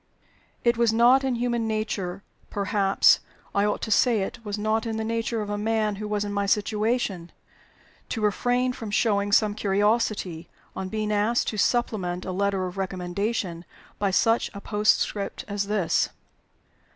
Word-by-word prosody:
It 235 -1 +3
was 235 -1 +3
not 240 +4 +5
in 260 -2 0
human 235 -1 -1
nature 200 -4 -3 0.3
perhaps 200 -1 +3 0.3
I 200 0 +2
ought 210 - -1
to 220 - -3
say 230 -1 +4
it 230 - -7
was 205 -1 -4
not 215 +2 0
in 220 -1 -2
the 220 - -2
nature 230 0 -1
of 205 - -7
a 205 - -2
man 215 -1 0
who 210 +1 -5
was 210 0 -1
in 205 - -4
my 200 0 0
situation 210 -3 0 0.8
to 225 - -3
refrain 245 +4 +1
from 225 -3 -7
showing 205 -1 +1
some 210 0 +4
curiosity, 205 -4 0 0.3
on 190 0 -4
being 215 +1 -2
asked 210 +3 +1
to 215 - -5
supplement 190 -6 0
a 185 - -3
letter 195 0 0
of 180 +1 -7
recommendation 185 -1 -2 0.4
by 200 - +1
such 225 +4 +2
a - - -5
postscript 210 -1 0
as 200 -1 -2
this. 200 -5 +1
210 Hz, 165 wpm, -25 LUFS, 200-225 Hz, 0.8 s, not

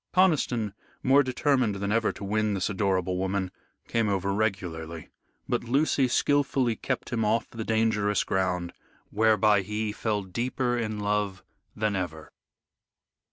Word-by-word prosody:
Conniston, 135 - +2 0.3
more 135 +2 +6
determined 130 -4 +1
than 100 +1 -2
ever 115 +1 +2
to - - -10
win 105 +1 0
this 95 +2 -1
adorable 95 -2 0
woman, 95 0 -1 0.4
came 115 -2 +1
over 100 0 0
regularly. 85 -6 -3 0.4
But - - -1
Lucy 135 +1 +2
skilfully 135 -2 +2
kept 130 0 -3
him 115 -1 +1
off 110 +2 +1
the 115 -1 -5
dangerous 110 -3 +1
ground, 90 -2 -1 0.4
whereby 105 -1 +4
he 105 +2 -2
fell 105 -1 -1
deeper 120 +5 -1
in 110 -3 -2
love 105 -2 -1 0.3
than 105 -1 0
ever. 85 -4 -4
105 Hz, 135 wpm, -27 LUFS, 95-115 Hz, 0.4 s, more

